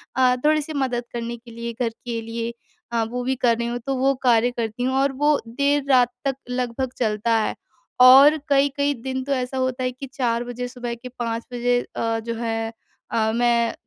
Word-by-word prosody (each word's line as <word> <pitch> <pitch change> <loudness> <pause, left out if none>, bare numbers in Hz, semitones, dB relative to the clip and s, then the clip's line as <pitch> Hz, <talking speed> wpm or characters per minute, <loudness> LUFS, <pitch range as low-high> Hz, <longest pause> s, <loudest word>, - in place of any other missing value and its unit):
अ, 255 -1 +4
थोड़ी-सी 305 0 +2
मदद 255 -4 -1
करने 235 0 -4
के 235 0 -15
लिए 235 0 -5
घर 230 - +2
के 230 0 -6
लिए। 230 +1 -4 0.4
अ, 230 -1 +2
वो 245 +2 -4
भी 260 +1 0
कर 235 -2 +2
रही 235 0 -2
हूँ 240 0 -3
तो 270 - 0
वो 270 +1 +3
कार्य 240 0 +4
करती 230 +1 -2
हूँ 260 +1 0
और 275 0 +2
वो 300 -1 +4
देर 280 +4 +1
रात 250 -2 +5 0.2
तक 270 -1 +1
लगभग 250 +1 -2
चलता 225 0 +1
है। 215 - -1 0.5
और 275 +4 +9
कई-कई 280 +1 +2
दिन 260 0 -3
तो 280 - -5
ऐसा 255 0 -2
होता 260 0 -1
है 255 - 0
कि 265 +2 -8
4:00 235 -2 0
बजे 245 0 -5
सुबह 245 -1 -5
के 250 +2 -10
5:00 230 -1 -2
बजे 245 0 +2 0.2
अ, 225 0 0
जो 230 +1 -4
है 225 -1 -2 0.4
अ, 220 -1 +1
मैं 235 -1 +2
245 Hz, 205 wpm, -23 LUFS, 230-260 Hz, 0.5 s, और